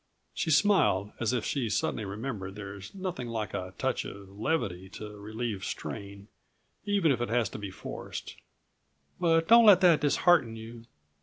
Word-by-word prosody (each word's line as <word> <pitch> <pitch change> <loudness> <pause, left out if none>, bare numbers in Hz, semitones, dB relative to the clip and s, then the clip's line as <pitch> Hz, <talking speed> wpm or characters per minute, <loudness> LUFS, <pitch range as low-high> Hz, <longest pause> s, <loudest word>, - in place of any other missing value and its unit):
She 165 - -2
smiled, 150 - +3
as 115 -1 +1
if 125 -3 -1
she'd 130 -6 -1
suddenly 105 +2 -1
remembered 100 -2 -5
there's 100 - -8
nothing 185 -10 -4
like 110 -4 -4
a 90 0 -5
touch - - -1
of 100 -1 -9
levity 100 - -2
to 105 -1 -8
relieve 110 -1 -4
strain, 100 +1 -6 0.6
even 200 -7 +2
if 125 - 0
it 120 - -1
has 115 -3 +1
to 105 - -8
be 100 -1 -5
forced. 95 - -7 0.8
"But 165 -2 +3
don't 235 +1 +8
let 195 -4 +9
that 170 -5 +5
dishearten 145 -5 +3
you. 115 +1 -10
115 Hz, 160 wpm, -29 LUFS, 100-160 Hz, 0.8 s, let